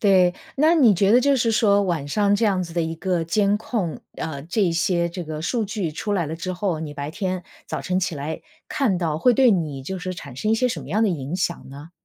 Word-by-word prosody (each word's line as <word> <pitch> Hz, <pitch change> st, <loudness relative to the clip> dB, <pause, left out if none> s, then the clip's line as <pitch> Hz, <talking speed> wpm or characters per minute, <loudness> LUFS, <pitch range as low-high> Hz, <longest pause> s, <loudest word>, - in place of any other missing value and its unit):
对， 185 Hz, -3 st, +4 dB, 0.2 s
那 310 Hz, +4 st, +4 dB
你 260 Hz, -10 st, +6 dB
觉 195 Hz, +3 st, +3 dB
得 245 Hz, -, +6 dB
就 280 Hz, +1 st, +3 dB
是 230 Hz, -2 st, +1 dB
说 205 Hz, -2 st, +4 dB
晚 170 Hz, -7 st, -2 dB
上 200 Hz, +6 st, +2 dB
这 205 Hz, -, +1 dB
样 195 Hz, -4 st, +2 dB
子 170 Hz, -, -7 dB
的 170 Hz, -, +1 dB
一 165 Hz, 0 st, -3 dB
个 180 Hz, 0 st, -1 dB
监 200 Hz, +4 st, +2 dB
控， 210 Hz, -7 st, -3 dB, 0.2 s
呃， 140 Hz, -4 st, -5 dB
这 175 Hz, +8 st, -1 dB
一 175 Hz, -, +2 dB
些 170 Hz, +1 st, +1 dB
这 175 Hz, +1 st, -6 dB
个 155 Hz, -2 st, -6 dB
数 225 Hz, +7 st, -1 dB
据 195 Hz, -6 st, -3 dB
出 205 Hz, +7 st, -3 dB
来 175 Hz, -5 st, 0 dB
了 155 Hz, -, -4 dB
之 175 Hz, +3 st, -4 dB
后， 180 Hz, -3 st, -2 dB
你 155 Hz, -2 st, -5 dB
白 145 Hz, 0 st, -5 dB
天 185 Hz, +1 st, -3 dB, 0.2 s
早 -, -, -4 dB
晨 185 Hz, 0 st, -1 dB
起 185 Hz, -2 st, -1 dB
来 145 Hz, +3 st, -5 dB, 0.3 s
看 245 Hz, -11 st, +1 dB
到， 165 Hz, -4 st, -1 dB
会 245 Hz, +10 st, +4 dB
对 250 Hz, +1 st, +5 dB
你 155 Hz, -7 st, -2 dB
就 190 Hz, +8 st, -5 dB
是 185 Hz, 0 st, -4 dB
产 140 Hz, -7 st, -9 dB
生 215 Hz, +12 st, -1 dB
一 -, -, +4 dB
些 255 Hz, -, +2 dB
什 205 Hz, -10 st, -2 dB
么 130 Hz, -, -11 dB
样 210 Hz, +8 st, +1 dB
的 -, -, +3 dB
影 155 Hz, -2 st, -3 dB
响 170 Hz, -5 st, -2 dB
呢？ 145 Hz, +4 st, -11 dB
185 Hz, 280 characters per minute, -23 LUFS, 160-210 Hz, 0.3 s, 你